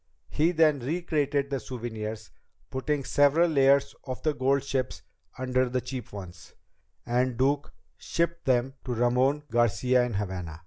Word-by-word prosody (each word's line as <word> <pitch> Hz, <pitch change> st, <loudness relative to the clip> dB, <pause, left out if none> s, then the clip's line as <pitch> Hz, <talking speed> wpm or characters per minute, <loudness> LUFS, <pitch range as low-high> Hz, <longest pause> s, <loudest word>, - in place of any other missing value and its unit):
He 160 Hz, +3 st, +2 dB
then 155 Hz, -4 st, +3 dB
recrated 145 Hz, -1 st, -1 dB
the 135 Hz, -, 0 dB
souvenirs, 110 Hz, -4 st, -6 dB, 0.4 s
putting 140 Hz, +2 st, -1 dB
several 145 Hz, +6 st, +4 dB
layers 140 Hz, -2 st, +3 dB
of 130 Hz, -2 st, -6 dB
the 155 Hz, -, +2 dB
gold 135 Hz, +1 st, +1 dB
ships 135 Hz, -2 st, -3 dB, 0.3 s
under 130 Hz, 0 st, 0 dB
the 130 Hz, +1 st, 0 dB
cheap 125 Hz, -2 st, -7 dB
ones, 90 Hz, -4 st, -10 dB, 0.5 s
and 125 Hz, 0 st, 0 dB
Duke 140 Hz, +3 st, +1 dB, 0.3 s
shipped 170 Hz, 0 st, -2 dB
them 130 Hz, 0 st, +2 dB
to 125 Hz, -2 st, -3 dB
Ramon 125 Hz, +5 st, +2 dB
Garcia 120 Hz, +2 st, +3 dB
in 120 Hz, -3 st, -3 dB
Havana. 90 Hz, -5 st, -4 dB
130 Hz, 140 wpm, -27 LUFS, 120-140 Hz, 0.5 s, several